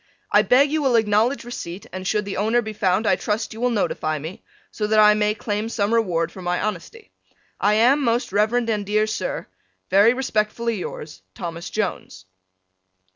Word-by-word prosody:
I 205 Hz, -, +6 dB
beg 255 Hz, +7 st, +4 dB
you 310 Hz, 0 st, 0 dB
will 265 Hz, -4 st, +2 dB
acknowledge 225 Hz, +4 st, +2 dB
receipt 195 Hz, -6 st, -7 dB
and 185 Hz, 0 st, -5 dB
should 210 Hz, 0 st, 0 dB
the 200 Hz, -, -5 dB
owner 225 Hz, +4 st, +1 dB
be 215 Hz, 0 st, -6 dB
found 195 Hz, +1 st, +1 dB
I 190 Hz, -, +4 dB
trust 215 Hz, +4 st, -3 dB
you 225 Hz, -, -9 dB
will 250 Hz, -, +2 dB
notify 155 Hz, -8 st, -1 dB
me, 160 Hz, +5 st, -8 dB, 0.3 s
so 210 Hz, -, -2 dB
that 215 Hz, 0 st, +2 dB
I 210 Hz, 0 st, +7 dB
may 210 Hz, 0 st, +1 dB
claim 210 Hz, +1 st, -3 dB
some 215 Hz, -1 st, -1 dB
reward 175 Hz, -7 st, +1 dB
for 185 Hz, -, -10 dB
my 180 Hz, 0 st, -1 dB
honesty. 215 Hz, -, -5 dB, 0.5 s
I 210 Hz, +1 st, +3 dB
am, 250 Hz, +7 st, +4 dB
Most 235 Hz, -2 st, 0 dB
Rev. 210 Hz, +3 st, +2 dB
and 230 Hz, -4 st, 0 dB
dear 210 Hz, +2 st, +1 dB
Sir, 215 Hz, 0 st, -3 dB, 0.5 s
Very 205 Hz, +6 st, +5 dB
respectfully 230 Hz, -2 st, -1 dB
yours, 150 Hz, -, -7 dB
Thomas 170 Hz, -, -6 dB
Jones. 95 Hz, -, -4 dB
210 Hz, 180 wpm, -22 LUFS, 195-230 Hz, 0.5 s, I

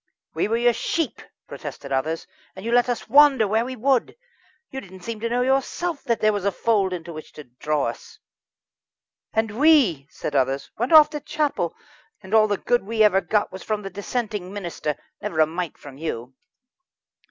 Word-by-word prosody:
"We -, -, 0 dB
were 225 Hz, +2 st, +1 dB
your 240 Hz, 0 st, +3 dB
sheep," 325 Hz, +6 st, -2 dB, 0.3 s
protested 140 Hz, -, -8 dB
others, 155 Hz, +5 st, -1 dB, 0.3 s
"and 190 Hz, +2 st, -9 dB
you 230 Hz, -, -1 dB
let 245 Hz, +1 st, +4 dB
us 245 Hz, -, -2 dB
wander 270 Hz, -3 st, +6 dB
where 220 Hz, +3 st, +2 dB
we 255 Hz, +1 st, -5 dB
would! 255 Hz, +1 st, +1 dB, 0.6 s
You 265 Hz, -, -5 dB
didn't 190 Hz, -3 st, -13 dB
seem 230 Hz, -2 st, -5 dB
to 230 Hz, +1 st, -2 dB
know 245 Hz, +1 st, +1 dB
yourself 275 Hz, +5 st, -1 dB
that 235 Hz, -3 st, 0 dB
there 215 Hz, 0 st, +4 dB
was 205 Hz, -2 st, -2 dB
a 200 Hz, -, +2 dB
fold 200 Hz, -2 st, +1 dB
into 170 Hz, -2 st, -6 dB
which 155 Hz, 0 st, -9 dB
to 150 Hz, -, -10 dB
draw 140 Hz, +3 st, -2 dB
us." 115 Hz, -, -7 dB, 1.1 s
"And 220 Hz, 0 st, -1 dB
we," 265 Hz, -, +4 dB
said 145 Hz, -, -5 dB
others, 135 Hz, +1 st, 0 dB
"went 240 Hz, +6 st, -2 dB
off 305 Hz, -1 st, +8 dB
to 300 Hz, -, -4 dB
chapel, 285 Hz, -, -1 dB, 0.5 s
and 190 Hz, +2 st, -9 dB
all 215 Hz, -1 st, +6 dB
the 205 Hz, -1 st, 0 dB
good 240 Hz, +2 st, +1 dB
we 220 Hz, +2 st, +1 dB
ever 195 Hz, -2 st, +5 dB
got 205 Hz, +4 st, 0 dB
was 190 Hz, -, -8 dB
from 210 Hz, +1 st, -3 dB
the 195 Hz, -, -6 dB
dissenting 205 Hz, -1 st, -4 dB
minister 175 Hz, -6 st, -4 dB, 0.3 s
never 195 Hz, -6 st, -3 dB
a 155 Hz, -, +7 dB
mite 170 Hz, +1 st, -5 dB
from 140 Hz, -1 st, -12 dB
you." 130 Hz, -6 st, -5 dB
210 Hz, 190 wpm, -23 LUFS, 170-245 Hz, 1.1 s, off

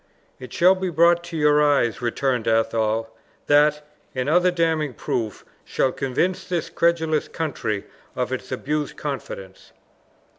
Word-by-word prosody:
"It 130 Hz, -, -10 dB
shall 180 Hz, +2 st, +5 dB
be 190 Hz, -1 st, -3 dB
brought 170 Hz, +1 st, +4 dB
to 170 Hz, -1 st, -6 dB
your 150 Hz, -1 st, +4 dB
eyes," 140 Hz, -6 st, +2 dB
returned 120 Hz, 0 st, -1 dB
Athol; 115 Hz, 0 st, 0 dB, 0.3 s
"that, 150 Hz, 0 st, +3 dB, 0.3 s
and 130 Hz, +1 st, -2 dB
other 180 Hz, +4 st, +4 dB
damning 160 Hz, -6 st, 0 dB
proofs, 110 Hz, -2 st, -3 dB, 0.2 s
shall 130 Hz, -, 0 dB
convince 170 Hz, +11 st, -1 dB
this 180 Hz, -3 st, -3 dB
credulous 160 Hz, -3 st, +1 dB
country 120 Hz, -10 st, -3 dB, 0.3 s
of -, -, -2 dB
its -, -, -6 dB
abused 150 Hz, 0 st, -3 dB
confidence." 100 Hz, -9 st, -7 dB
150 Hz, 135 wpm, -23 LUFS, 120-165 Hz, 0.3 s, shall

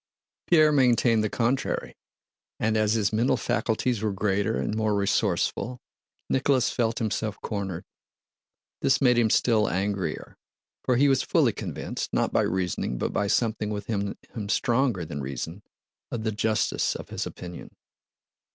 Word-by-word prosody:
Pierre 155 Hz, -3 st, +6 dB
maintained 120 Hz, -5 st, +3 dB
the 110 Hz, -, 0 dB
contrary, 120 Hz, +5 st, -1 dB, 0.6 s
and 110 Hz, 0 st, +1 dB
as 110 Hz, 0 st, +2 dB
his 110 Hz, -2 st, +1 dB
mental 115 Hz, +4 st, +2 dB
faculties 115 Hz, -1 st, 0 dB
were 110 Hz, -1 st, 0 dB
greater 100 Hz, +2 st, 0 dB
and 105 Hz, -, -2 dB
more 110 Hz, -1 st, +1 dB
resourceful, 100 Hz, +4 st, 0 dB, 0.5 s
Nicholas 130 Hz, -1 st, +2 dB
felt 115 Hz, -2 st, 0 dB
himself 110 Hz, -1 st, -2 dB
cornered. 95 Hz, -5 st, -3 dB, 1.0 s
This 135 Hz, -, +3 dB
made 125 Hz, -3 st, +4 dB
him 115 Hz, -2 st, +3 dB
still 110 Hz, -1 st, +3 dB
angrier, 95 Hz, +1 st, -2 dB, 0.5 s
for 125 Hz, -, +2 dB
he 140 Hz, +4 st, +4 dB
was 135 Hz, -1 st, +3 dB
fully -, -, +2 dB
convinced, -, -, -5 dB
not -, -, 0 dB
by -, -, +4 dB
reasoning 90 Hz, -9 st, -1 dB
but -, -, -2 dB
by 105 Hz, -, 0 dB
something 110 Hz, 0 st, 0 dB
within 100 Hz, -1 st, -3 dB, 0.2 s
him 105 Hz, -4 st, -5 dB
stronger 115 Hz, -5 st, +1 dB
than 70 Hz, -1 st, -5 dB
reason, 80 Hz, +8 st, -5 dB, 0.5 s
of 115 Hz, -2 st, -4 dB
the 110 Hz, -, 0 dB
justice 110 Hz, +1 st, 0 dB
of -, -, -8 dB
his -, -, -3 dB
opinion. 90 Hz, -1 st, -9 dB
110 Hz, 145 wpm, -26 LUFS, 100-120 Hz, 1.0 s, Pierre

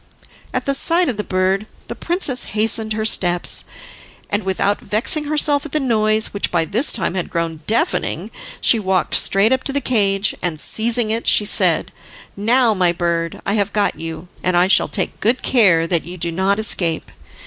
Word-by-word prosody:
At -, -, -3 dB
the 275 Hz, -, 0 dB
sight 335 Hz, +4 st, +1 dB
of 235 Hz, -, -3 dB
the 210 Hz, -, -2 dB
bird, 190 Hz, +2 st, -1 dB, 0.2 s
the -, -, -5 dB
princess 335 Hz, -8 st, -1 dB
hastened 220 Hz, 0 st, -1 dB
her 215 Hz, 0 st, -3 dB
steps, 175 Hz, -5 st, +1 dB, 0.7 s
and 205 Hz, -, 0 dB
without 190 Hz, +2 st, -1 dB
vexing 235 Hz, +9 st, -1 dB
herself 290 Hz, -1 st, +2 dB
at 305 Hz, -, -9 dB
the 305 Hz, -, +1 dB
noise 220 Hz, -4 st, +1 dB
which 200 Hz, -, -1 dB
by 170 Hz, -2 st, 0 dB
this 230 Hz, -, +1 dB
time -, -, 0 dB
had 185 Hz, -2 st, -3 dB
grown 165 Hz, -1 st, -3 dB
deafening, 235 Hz, -, 0 dB, 0.3 s
she 230 Hz, -, +4 dB
walked 190 Hz, -3 st, -1 dB
straight 200 Hz, +5 st, +3 dB
up 260 Hz, -, -1 dB
to 275 Hz, -, 0 dB
the 285 Hz, -, +1 dB
cage, 205 Hz, -6 st, 0 dB
and 165 Hz, -4 st, -3 dB
seizing 225 Hz, +3 st, 0 dB
it, 230 Hz, +1 st, -3 dB
she 210 Hz, -, +5 dB
said: -, -, +2 dB, 0.4 s
"Now, 230 Hz, +3 st, +2 dB
my 180 Hz, -3 st, +2 dB
bird, 170 Hz, -1 st, -3 dB
I 200 Hz, -, -1 dB
have 205 Hz, -1 st, -1 dB
got 205 Hz, -1 st, 0 dB
you, 165 Hz, +1 st, -7 dB
and 180 Hz, -1 st, 0 dB
I 175 Hz, -, +4 dB
shall 195 Hz, -, +3 dB
take 190 Hz, -, -4 dB
good 240 Hz, +4 st, 0 dB
care 190 Hz, -10 st, +3 dB
that 165 Hz, -1 st, -1 dB
you 175 Hz, +2 st, -9 dB
do 170 Hz, 0 st, -2 dB
not 190 Hz, +4 st, 0 dB
escape." 175 Hz, -7 st, 0 dB
205 Hz, 190 wpm, -18 LUFS, 180-235 Hz, 0.7 s, she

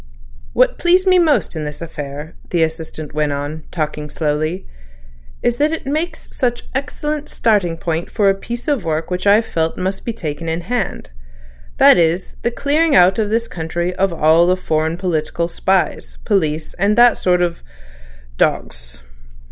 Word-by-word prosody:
"What -, -, +2 dB
pleased 360 Hz, +2 st, +3 dB
me 370 Hz, -1 st, +5 dB
most 310 Hz, -, +2 dB
in 155 Hz, -, -3 dB
this 150 Hz, 0 st, -6 dB
affair," 150 Hz, -1 st, -7 dB, 0.2 s
the 170 Hz, -2 st, +2 dB
Assistant 160 Hz, -2 st, -5 dB
went 150 Hz, -1 st, 0 dB
on, 145 Hz, +2 st, -5 dB
talking 150 Hz, -2 st, -3 dB
slowly, 155 Hz, +4 st, -2 dB, 0.8 s
"is 240 Hz, 0 st, +1 dB
that 300 Hz, +3 st, +2 dB
it 325 Hz, -, -4 dB
makes 320 Hz, +4 st, -3 dB
such 245 Hz, -2 st, 0 dB
an -, -, -21 dB
excellent 295 Hz, +2 st, -3 dB
starting 200 Hz, -7 st, +1 dB
point 165 Hz, 0 st, -3 dB
for 205 Hz, -3 st, +1 dB
a 195 Hz, -, +5 dB
piece 235 Hz, +5 st, -6 dB
of 285 Hz, -7 st, 0 dB
work 160 Hz, +1 st, -2 dB
which 180 Hz, +2 st, -1 dB
I've 210 Hz, +3 st, +5 dB
felt 160 Hz, -4 st, -2 dB
must 190 Hz, +1 st, -3 dB
be 235 Hz, -, -2 dB
taken 165 Hz, -4 st, -4 dB
in 165 Hz, +1 st, -2 dB
hand—that -, -, 0 dB
is, 170 Hz, +2 st, +1 dB
the -, -, +1 dB
clearing 290 Hz, +5 st, +1 dB
out 185 Hz, +3 st, +5 dB
of 210 Hz, -2 st, 0 dB
this 230 Hz, +2 st, 0 dB
country 170 Hz, 0 st, -3 dB
of 195 Hz, +1 st, +1 dB
all 165 Hz, +1 st, +4 dB
the 185 Hz, +1 st, +3 dB
foreign 160 Hz, -2 st, -1 dB
political 170 Hz, -2 st, -1 dB
spies, 190 Hz, +2 st, -1 dB
police, 160 Hz, -6 st, 0 dB
and 205 Hz, +3 st, +2 dB
that 240 Hz, 0 st, +6 dB
sort 180 Hz, -1 st, +2 dB
of—of—dogs. -, -, -5 dB
170 Hz, 165 wpm, -18 LUFS, 155-220 Hz, 0.8 s, that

